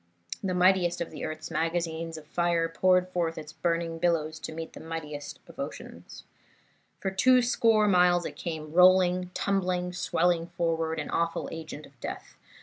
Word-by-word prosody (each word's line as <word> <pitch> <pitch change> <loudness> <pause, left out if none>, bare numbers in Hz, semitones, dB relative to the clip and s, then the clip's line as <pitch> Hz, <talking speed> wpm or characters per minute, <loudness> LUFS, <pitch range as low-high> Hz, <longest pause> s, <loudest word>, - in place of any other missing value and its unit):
The 185 -2 -1
mightiest 180 -1 +3
of 170 - -4
earth's 155 +1 -6
magazines 165 0 -2
of 155 - -11
fire 170 +1 +1
poured 180 +2 +3
forth 170 -3 -1
its 155 -1 -8
burning 165 -1 -1
billows 160 -2 0
to - - -6
meet 165 0 -7
the - - -10
mightiest 155 -3 -6
of - - -15
oceans. - - -8 0.8
For 190 - -2
two 250 +6 +4
score 225 -3 +3
miles 180 -2 +4
it 145 - -5
came 155 -1 -6
rolling, 180 0 +5
tumbling, 180 -2 0
swelling 175 -1 +1
forward, 165 -2 -1
an - - -5
awful 170 0 -1
agent 160 -2 -7
of 135 -2 -21
death. - - -7
170 Hz, 155 wpm, -28 LUFS, 160-180 Hz, 0.8 s, rolling